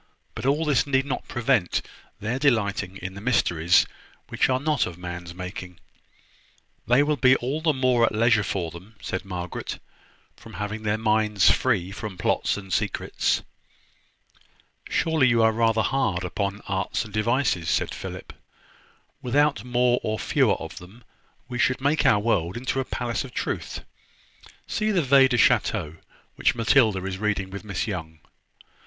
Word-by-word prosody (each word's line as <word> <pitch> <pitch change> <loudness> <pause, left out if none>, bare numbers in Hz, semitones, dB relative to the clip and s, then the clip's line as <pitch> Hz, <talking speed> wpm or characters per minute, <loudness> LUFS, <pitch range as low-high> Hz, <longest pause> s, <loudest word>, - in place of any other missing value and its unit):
But - - -4
all 150 +4 +2
this 145 -3 +2
need 135 -1 +2
not 140 - -4
prevent 120 -6 +1 0.4
their 115 +5 -2
delighting 100 -8 +1
in 95 +1 -5
the 100 - -9
mysteries 90 -7 +3 0.4
which - - +1
are 130 0 +2
not 150 -2 +1
of 85 - -8
man's 90 -1 -7
making." 90 -1 -7 1.1
"They 125 +5 +5
will 150 0 0
be 130 +1 +5
all 135 +5 -2
the 160 -1 +3
more 130 -4 +3
at - - -1
leisure 115 +1 +3
for 85 -3 -3
them," 95 +7 -13
said 95 - -4
Margaret, 90 -2 -5 0.6
"from - - -14
having 105 +3 -4
their 105 0 0
minds 110 -3 +3
free 90 +1 0
from 105 -2 -7
plots - - 0
and 95 -2 -7
secrets." - - 0 1.5
"Surely 160 -5 +2
you 115 -2 +3
are 110 - +5
rather 115 0 +2
hard 115 -10 0
upon 100 +3 -3
arts 95 +2 -1
and 105 - -12
devices," 110 -5 +1
said - - 0
Philip. - - -8 0.9
"Without 140 -3 +1
more 125 0 +2
or 110 0 -2
fewer - - +2
of - - -8
them, 100 +7 -15 0.4
we 125 -1 -5
should 130 +2 +2
make 145 +4 +2
our 105 - +5
world 100 -4 0
into 130 +2 -2
a 130 - -1
Palace 120 0 -3
of 130 -3 -11
Truth, - - -3 0.8
see 215 0 -1
the 185 -6 +2
Veillees 135 0 +6
du 125 - +1
Chateau, 105 -9 +2 0.4
which - - +2
Matilda 110 -5 +3
is 95 -1 -4
reading 100 -3 -1
with 100 +2 -7
Miss 100 -5 -3
Young. 80 -7 -5
110 Hz, 160 wpm, -25 LUFS, 95-130 Hz, 1.5 s, Veillees